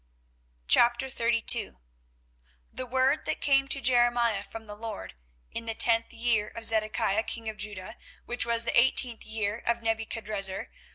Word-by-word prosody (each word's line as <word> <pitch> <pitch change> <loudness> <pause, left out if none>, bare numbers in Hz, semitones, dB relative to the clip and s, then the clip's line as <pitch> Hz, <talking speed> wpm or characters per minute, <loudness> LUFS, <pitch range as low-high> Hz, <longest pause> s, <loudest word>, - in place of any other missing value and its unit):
24:032:001 235 - +2 1.0
The 255 - -4
word 260 +4 +1
that - - -3
came 275 -1 +2
to 275 - -1
Jeremiah 240 -4 +2
from 225 +1 -10
the 210 - -9
LORD 215 0 -8 0.4
in 230 - -6
the 225 - -3
tenth 230 0 +4
year 230 -2 0
of 230 -1 -5
Zedekiah 215 -1 +2
king 225 0 -3
of 215 -1 -5
Judah, 205 +1 -4 0.3
which 245 +1 -2
was 230 -1 +1
the 235 - -1
eighteenth 240 -1 +3
year 215 0 -3
of 235 0 0
Nebuchadrezzar. 215 -3 -1
230 Hz, 140 wpm, -27 LUFS, 215-240 Hz, 1.0 s, tenth